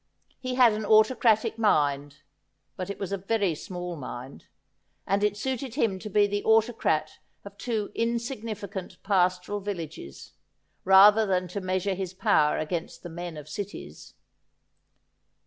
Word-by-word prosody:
He 255 -1 -3
had 245 -3 +6
an 215 +1 -3
autocratic 220 +1 +3
mind, 145 -7 +1 0.5
but 185 +1 -5
it 200 - -5
was 195 -1 -5
a 200 - -2
very 200 -2 0
small 175 +2 -6
mind, 130 -2 -9 0.6
and 200 +1 0
it 205 -1 +1
suited 260 0 -3
him 220 -9 0
to 215 - -7
be 205 +1 +4
the 205 0 -2
autocrat 220 -9 +1 0.3
of 200 0 -10
two 220 -5 -2
insignificant 225 -5 -4
pastoral 185 0 +1
villages, 165 - -7 0.5
rather 205 +3 +7
than 185 -1 0
to 200 +3 -4
measure 185 +1 -1
his 185 -1 -5
power 185 -7 +3
against 165 +2 -4
the 175 - -7
men 170 -1 -7
of 150 -1 -9
cities. 200 +6 -8
200 Hz, 140 wpm, -27 LUFS, 175-215 Hz, 0.6 s, rather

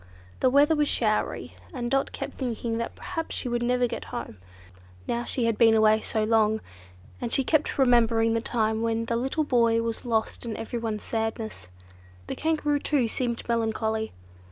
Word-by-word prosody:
The 255 - +4
weather 290 +4 +5
was 295 -1 +2
showery, 215 -2 0 0.2
and 240 -2 -3
Dot 270 0 +1
kept - - -6
thinking 235 -3 -2
that 230 - -4
perhaps 335 -3 -5
she - - -4
would 240 0 -1
never 245 +1 +2
get 240 - -4
home, 110 - -6 0.7
now 240 0 -1
she 245 - -1
had 230 -2 0
been 225 -1 +6 0.3
so 220 -2 -1
long 220 -1 +3
away, 220 - -4 0.6
and 230 - -3
she 270 - +2
kept 310 +3 +1
remembering 230 -3 +4
the 230 - +1
time 220 -1 0
when 230 0 0
the 230 - -1
little 265 +6 0
boy 230 -4 +3
was 230 -1 -3
lost 225 -3 -1
and 230 -3 -4
everyone's 225 -2 -3
sadness. 220 - -3 0.6
The - - -4
Kangaroo 300 -2 0
too 280 -5 +1
seemed 235 0 -3
melancholy. 220 -1 0
230 Hz, 175 wpm, -26 LUFS, 225-255 Hz, 0.7 s, been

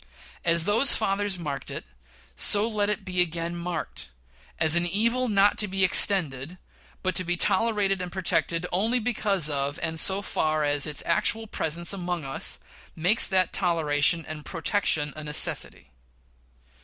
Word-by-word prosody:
As 165 -1 +2
those 225 +6 +6
fathers 200 -2 -2
marked 145 -5 -6
it, - - -7 0.5
so 205 +2 +5
let 210 -2 -2
it 210 -2 -3
be 185 -2 -1
again 170 0 -3
marked, 170 - -6 0.5
as 160 0 +4
an 170 0 +1
evil 235 +7 0
not 205 0 +2
to 210 - +3
be 195 0 -1
extended, 175 -5 +2 0.5
but 185 0 -1
to 185 - +1
be 175 0 -3
tolerated 200 -1 +1
and 180 -1 -7
protected 175 -2 -2
only 220 +7 0
because 210 -7 +1
of, 140 -1 -2
and 160 0 -2
so 195 +4 +3
far 155 -5 -2
as, 145 0 +1
its 150 -2 -2
actual 220 +6 0
presence 170 -3 -1
among 175 -4 -5
us 135 - -1 0.4
makes 180 +8 +5
that 185 -2 0
toleration 165 -2 0
and 155 -1 -9
protection 160 -4 -1
a 155 - -9
necessity. 150 - -1
180 Hz, 155 wpm, -24 LUFS, 160-200 Hz, 0.5 s, those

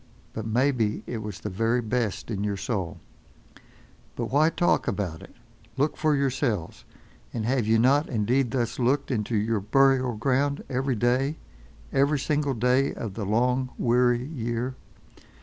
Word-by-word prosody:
But, 110 0 -5
maybe, 120 -2 +1
it 115 - -4
was 105 -3 -6
the 105 - -4
very 115 +5 +1
best 115 -2 -2
in 100 -2 -2
your 100 -1 -1
soul—— 95 -5 -3 1.2
But - - -4
why 150 +4 +4
talk 175 +1 +1
about 95 -6 -2
it? - - -14 0.4
Look 150 +2 +1
for 155 -2 +2
yourselves. 130 - -1 0.5
And 110 -2 -2
have 125 -2 +1
you 110 +1 +4
not 135 +6 +3
indeed 120 +3 +1
thus 120 -1 -2
looked 130 +4 +1
into 110 -1 -1
your 110 +1 +1
burial 130 +3 +3
ground 140 +5 0
every 130 0 0
day, 125 +7 +1 0.6
every 140 +2 +3
single 145 0 0
day 125 +4 +2
of 110 -4 -5
the 100 -1 -4
long, 125 +4 +1
weary 120 0 +2
year? 120 -3 -3
125 Hz, 150 wpm, -26 LUFS, 110-135 Hz, 1.2 s, why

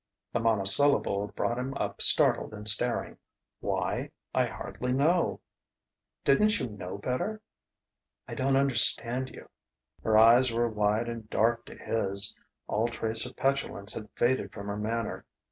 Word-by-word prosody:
The - - +1
monosyllable 110 0 +4
brought 120 +1 -1
him 135 +2 -4
up - - -4
startled - - +4
and 105 0 -6
staring. 120 +3 -1 0.4
"Why? - - -2 0.2
I - - +2
hardly 125 0 -5
know...." 160 +6 +1 0.8
"Didn't 210 +10 +3
you 130 - -2
know 100 -2 -7
better?" 130 - -3 0.8
"I - - -7
don't 135 -1 0
understand 130 -1 +2
you - - -13 0.3
" - - -36
Her 110 -1 +3
eyes 120 +3 +6
were 120 +1 +1
wide 105 +1 0
and 115 -2 -7
dark 115 +2 +1
to - - -11
his; 100 -2 0 0.3
all 110 +2 0
trace 115 0 0
of 125 - -12
petulance 135 -7 -1
had 105 -2 -8
faded 130 +2 0
from 100 -1 -9
her 100 - -3
manner. 115 +2 -3
115 Hz, 145 wpm, -28 LUFS, 105-130 Hz, 0.8 s, eyes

